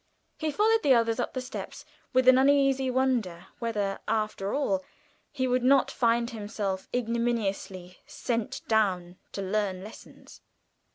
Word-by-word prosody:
He 315 - -1
followed 440 +8 +2
the 270 -3 +5
others 230 -1 +1
up - - -2
the 255 - -1
steps 255 - -8 0.3
with 255 0 +2
an 255 0 +8
uneasy 270 -1 +3
wonder 245 -9 0
whether, 205 -4 -2
after 215 -2 -1
all, 195 -10 0 0.5
he 260 -2 -1
would 250 0 +1
not 270 +1 +4
find 235 0 +1
himself 205 -3 -4
ignominiously 225 -6 -2
set 230 -3 -3
down 185 -5 +1 0.2
to 195 - -4
learn 190 -1 -1
lessons. 215 - -13
230 Hz, 135 wpm, -28 LUFS, 195-255 Hz, 0.5 s, an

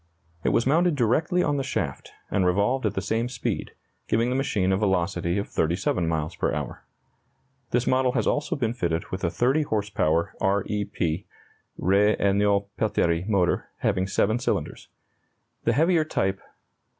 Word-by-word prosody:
It - - +2
was 115 - +2
mounted 165 +4 +3
directly 155 - +2
on 145 -1 +1
the 135 - -1
shaft, - - -3 0.2
and 95 - +2
revolved 100 +7 +2
at - - -3
the 95 - -2
same 115 +5 -1
speed, 125 -3 -3 0.3
giving 115 +2 +1
the - - 0
machine 110 -9 +1
a 95 - +2
velocity 90 -3 0
of 100 - -2
37 85 +1 0
miles 80 -1 -2
per - - 0
hour. - - -5 0.9
This 120 +1 +1
model 130 -1 +2
has - - 0
also 145 - 0
been 120 -5 -1
fitted 85 -3 -2
with 95 - -4
a 85 - +2
30 130 - +2
horse 105 -8 -2
power 85 -3 +1
R 100 0 +2
E 105 -1 -2
P 90 -2 -2 0.5
(R. 95 - +1 0.3
Esnault 100 0 +2
Pelterie) 90 -5 +1
motor, 95 -5 +1
having 95 0 +1
7 110 +3 +1
cylinders. 125 - -2 0.8
The 115 - +3
heavier 165 +4 +3
type 95 -10 -1
"No. - - -24
105 Hz, 170 wpm, -25 LUFS, 95-125 Hz, 0.9 s, mounted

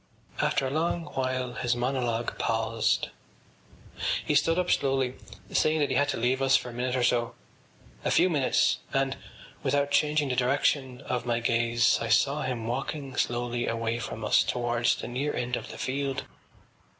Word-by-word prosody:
After 135 - +1
a 130 - -2
long 165 +2 0
while 130 -1 -1
his 120 0 0
monologue 120 -2 -1
paused. 115 -1 0 1.2
He - - +1
stood 165 +3 +3
up 180 0 +1
slowly, 135 -2 +1 0.4
saying 155 +1 +2
that 145 -2 +1
he - - +1
had 145 0 +2
to - - -1
leave 125 +3 +1
us 135 0 +5
for 125 - -6
a - - -11
minute 125 +1 -1
or 125 - +1
so, 120 -1 +1 0.7
a - - 0
few - - +4
minutes, 145 -7 +2
and, 135 -1 0 0.5
without 145 0 +1
changing 150 0 +2
the 125 - 0
direction 130 0 +1
of 125 -2 -3
my 120 -1 +1
gaze, 115 -1 +2
I 115 - -2
saw 140 +7 +3
him 125 -4 -3
walking 135 +3 -4
slowly 120 0 -1
away 115 0 -1
from 110 -1 -5
us - - +5
towards 120 -1 +1
the - - -6
near 135 +5 -2
end 125 0 -1
of - - -6
the - - -8
field. 135 0 -2
125 Hz, 175 wpm, -28 LUFS, 120-140 Hz, 1.2 s, us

